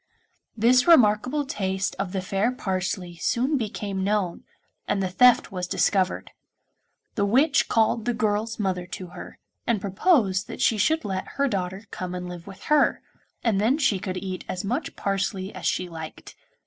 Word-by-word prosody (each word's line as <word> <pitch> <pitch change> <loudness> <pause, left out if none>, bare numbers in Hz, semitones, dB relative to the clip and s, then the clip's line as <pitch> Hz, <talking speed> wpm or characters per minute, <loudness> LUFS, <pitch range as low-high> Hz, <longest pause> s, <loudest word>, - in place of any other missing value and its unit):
This 250 +5 +4
remarkable 255 0 +4
taste 190 -6 -2
of 185 - -2
the 190 -1 -2
fair 195 +5 0
Parsley 185 -5 -3
soon 255 - +1
became 205 -5 -3
known, 200 -3 -1 0.4
and - - 0
the 190 -1 -1
theft 250 +4 +5
was 180 -2 -3
discovered. 190 0 0 0.8
The 205 - 0
witch 270 +8 +3
called 225 0 +2
the 245 - +1
girl's 220 +1 -1
mother 185 -4 -2
to 185 0 -7
her, - - -10 0.3
and 235 -3 +2
proposed 200 - +2
that - - -8
she 220 - +2
should 320 +10 +2
let 190 -2 -3
her 280 0 +3
daughter 190 -2 -3
come 180 0 -5
and 180 0 -5
live 175 0 -9
with 195 -1 -11
her, 300 -2 +2 0.4
and 215 -4 +2
then 240 +7 +3
she 245 -10 +2
could 185 0 -4
eat 185 0 -5
as 185 +2 -3
much 245 +10 -2
parsley 195 0 -2
as 180 -3 -4
she 180 - 0
liked. 160 -2 -9
200 Hz, 170 wpm, -25 LUFS, 185-235 Hz, 0.8 s, theft